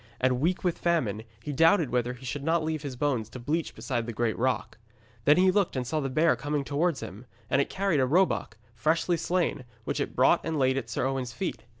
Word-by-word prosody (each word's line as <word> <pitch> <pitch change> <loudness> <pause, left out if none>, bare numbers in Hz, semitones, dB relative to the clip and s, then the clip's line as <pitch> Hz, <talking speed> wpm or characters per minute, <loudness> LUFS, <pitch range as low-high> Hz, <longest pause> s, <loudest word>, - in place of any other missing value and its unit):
And 125 -1 +2
weak 175 +6 0
with 180 -2 0
famine, 130 - 0 0.2
he 145 - -4
doubted 165 +1 +4
whether 125 0 0
he 125 +1 -12
should 140 +3 -4
not 165 +1 +1
leave 155 -1 -2
his 140 -4 -5
bones 125 -5 -1
to 130 - -9
bleach 155 +7 -2
beside 120 -4 -3
the - - -2
great 115 -1 0
rock. - - -1 0.5
Then 150 - +6
he 185 +1 +5
looked, 195 -5 +1
and 130 -1 -1
saw 155 +5 -1
the 135 -2 -2
bear 155 +5 +3
coming 145 0 -2
towards 145 +2 0
him, 110 +7 -9 0.2
and 140 - +4
it - - -2
carried 190 -5 0
a 130 - +3
roebuck, 165 - +1 0.2
freshly 160 +9 +1
slain, 170 -4 -1 0.2
which - - -2
it - - -3
brought - - +4
and 160 -1 -2
laid 130 -1 +2
at 135 - -3
Sir - - -1
Owen's 130 -2 -2
feet. 185 - -4
145 Hz, 230 wpm, -28 LUFS, 125-165 Hz, 0.5 s, Then